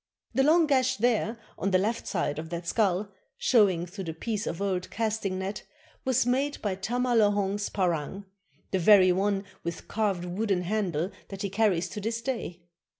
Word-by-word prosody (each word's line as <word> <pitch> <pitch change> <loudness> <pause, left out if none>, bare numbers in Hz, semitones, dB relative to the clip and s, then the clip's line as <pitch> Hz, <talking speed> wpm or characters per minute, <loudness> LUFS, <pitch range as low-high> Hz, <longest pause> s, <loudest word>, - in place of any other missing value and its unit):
The 265 - +3
long 320 +4 +5
gash 260 -3 +2
there, 230 0 +1 0.2
on 195 - 0
the 185 - +4
left 215 +5 -1
side 155 -5 -1
of 160 0 -6
that 170 0 -5
skull, 200 +1 +1 0.3
showing 195 -8 +3
through 190 +2 -7
the 160 -1 -5
piece 215 +4 -3
of 165 - -3
old 190 -2 -1
casting 215 -4 -1
net, 190 +2 -4 0.4
was 260 -2 +2
made 270 +4 0
by 205 -3 0
Tama 245 +6 -1
Lohong's 205 -2 +2
parang, 185 +1 -1 0.5
the 190 - +1
very 185 0 +7
one 195 +2 +1 0.2
with 170 0 -5
carved 200 -5 -1
wooden 190 0 -1
handle 185 -3 -1 0.2
that 195 0 -6
he 200 - -2
carries 195 -4 +2
to 210 - -6
this 225 +3 -2
day. 225 -9 -4
200 Hz, 175 wpm, -28 LUFS, 180-225 Hz, 0.5 s, very